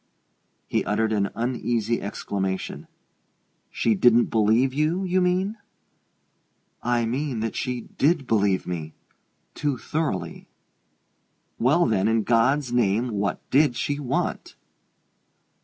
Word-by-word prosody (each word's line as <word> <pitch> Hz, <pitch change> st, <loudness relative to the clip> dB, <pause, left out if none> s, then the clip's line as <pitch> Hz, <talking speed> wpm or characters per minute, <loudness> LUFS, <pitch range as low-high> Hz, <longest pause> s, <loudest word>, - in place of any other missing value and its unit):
He -, -, 0 dB
uttered 110 Hz, 0 st, 0 dB
an 100 Hz, -2 st, +1 dB
uneasy 120 Hz, -1 st, -1 dB
exclamation. 95 Hz, -2 st, -4 dB, 0.8 s
"She 115 Hz, -, +1 dB
didn't 120 Hz, +3 st, +4 dB
believe 115 Hz, +4 st, +3 dB
you, 155 Hz, +6 st, 0 dB
you 185 Hz, 0 st, +1 dB
mean?" 185 Hz, +4 st, 0 dB, 1.2 s
"I 120 Hz, -1 st, +1 dB
mean 130 Hz, +1 st, -2 dB
that 115 Hz, -1 st, -3 dB
she 125 Hz, -2 st, -2 dB
did 145 Hz, +4 st, 0 dB
believe 100 Hz, -5 st, +1 dB
me: 80 Hz, -3 st, -5 dB, 0.6 s
too 145 Hz, -3 st, -1 dB
thoroughly." 155 Hz, +5 st, -3 dB, 1.1 s
"Well, 150 Hz, +9 st, +3 dB
then 105 Hz, -3 st, +1 dB
in 110 Hz, 0 st, +2 dB
God's 120 Hz, +4 st, +2 dB
name, 120 Hz, 0 st, +2 dB
what 100 Hz, -3 st, -2 dB
did 140 Hz, -2 st, +4 dB
she 145 Hz, +3 st, -2 dB
want?" 135 Hz, -4 st, -2 dB
120 Hz, 110 wpm, -24 LUFS, 110-145 Hz, 1.2 s, didn't